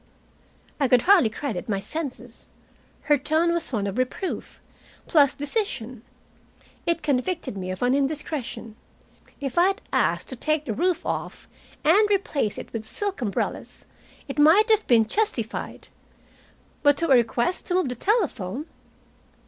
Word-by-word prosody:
I 275 - +3
could 250 -1 +4
hardly 365 - +5
credit 220 -4 -5
my 200 -2 0
senses. 250 -2 -7 0.5
Her 295 -2 +3
tone 315 +4 +1
was 340 -3 -2
one 210 -5 -1
of 200 +4 -3
reproof, 255 +9 -3 0.5
plus 290 -5 +4
decision. 280 - -3 0.9
It 335 0 0
convicted 295 - -1
me 185 -1 -5
of 185 +5 -4
an 250 +1 +3
indiscretion. 275 -5 -3 0.6
If 275 +2 -1
I 355 - +6
had 390 - -1
asked - - +1
to 260 - -5
take 310 +4 0
the 225 - -2
roof 360 - 0
off - - -4 0.4
and 405 +8 +5
replace 315 - 0
it - - -9
with 225 -2 -3
silk 395 - -4
umbrellas, 205 -5 -3 0.4
it 275 +1 -5
might 375 +10 +6
have 435 -1 +3
been 230 -3 +5
justified. 265 - -3 0.9
But 290 -1 +4
to 335 -2 0
a - - +8
request 240 +6 +1
to 360 - 0
move 365 -8 +1
the - - -2
telephone! 285 - -1
285 Hz, 150 wpm, -24 LUFS, 235-340 Hz, 0.9 s, a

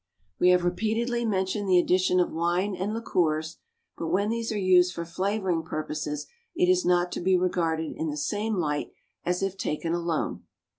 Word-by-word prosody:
We 180 - +5
have 180 -1 +4
repeatedly 225 +6 0
mentioned 195 -1 -1
the 180 - +6
addition 180 +1 +3
of 180 - +1
wine 175 +4 0
and 190 +3 -2
liqueurs; 165 -8 -1 0.4
but 165 - -4
when 195 +5 +1
these 230 0 -2
are 215 - -2
used 180 -2 +4
for 170 - -4
flavouring 190 0 -1
purposes 155 -2 -4 0.3
it 360 +1 +3
is 365 0 +3
not 175 0 +2
to - - -4
be 185 +1 +3
regarded 165 -3 0
in 160 - -2
the 150 - -4
same 210 +9 -1
light 150 -5 -2 0.3
as 180 +2 -1
if 195 -1 -1
taken 165 -1 -2
alone. 170 -2 -2
180 Hz, 180 wpm, -27 LUFS, 165-200 Hz, 0.4 s, the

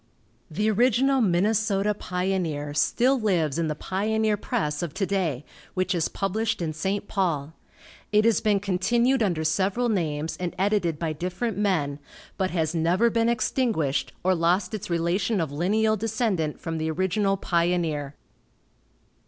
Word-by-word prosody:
The 210 +7 -1
original 255 +4 +3
Minnesota 205 +1 +2
Pioneer 180 -7 -2
still 250 - +2
lives 170 - +1
in 165 - 0
the 150 - -2
Pioneer 215 +5 0
Press 195 -9 -2
of 170 -4 -4
to 195 - 0
day, 170 -9 -1 0.3
which 185 0 0
is 170 -3 +1
published 215 +3 -1
in 160 -3 -2
St. 195 +6 -2
Paul. 160 -7 -1 0.6
It 210 +1 +4
has 230 -1 +3
been 210 -2 +2
continued 235 +7 +1
under 175 -7 +1
several 195 +9 +1
names 160 -6 -1
and 180 -1 -4
edited 190 -4 +1
by 160 0 -2
different 180 +8 -3
men, 155 -9 0 0.4
but 190 -1 0
has 160 -2 -1
never 175 +8 +2
been 230 0 +2
extinguished 220 - 0
or 185 +1 +3
lost 180 +3 +1
its 215 - -5
relation 175 +5 0
of 160 -4 -2
lineal 215 +8 +1
descendant 210 -8 -1
from 165 -1 -4
the 160 0 -1
original 190 +4 +1
Pioneer. 170 -6 0
185 Hz, 145 wpm, -25 LUFS, 165-215 Hz, 0.6 s, It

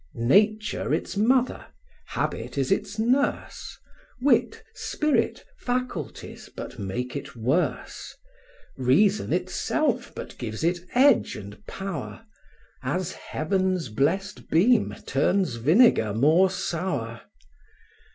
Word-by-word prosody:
Nature 210 - +2
its - - -4
mother, 250 +5 +2 0.4
habit - - -3
is 135 +3 0
its 205 +1 -1
nurse; 250 +6 0 0.4
Wit, 290 - +2
spirit, 305 -7 -1
faculties, 245 - -4
but - - -7
make 120 +7 -4
it 140 -1 -6
worse; 130 +10 -2 0.6
Reason 180 +12 +3
itself 260 -6 0
but - - -7
gives 110 +1 -5
it 175 +1 +1 0.2
edge 265 -1 +4
and 100 0 -10
power; 195 - -6 0.6
As 185 0 -2
Heaven's 185 - -1
blest 185 - -1
beam 210 +7 +3
turns 150 0 +1
vinegar 135 - +4
more 160 +10 +4
sour. 165 -10 -3
185 Hz, 100 wpm, -25 LUFS, 135-220 Hz, 0.6 s, edge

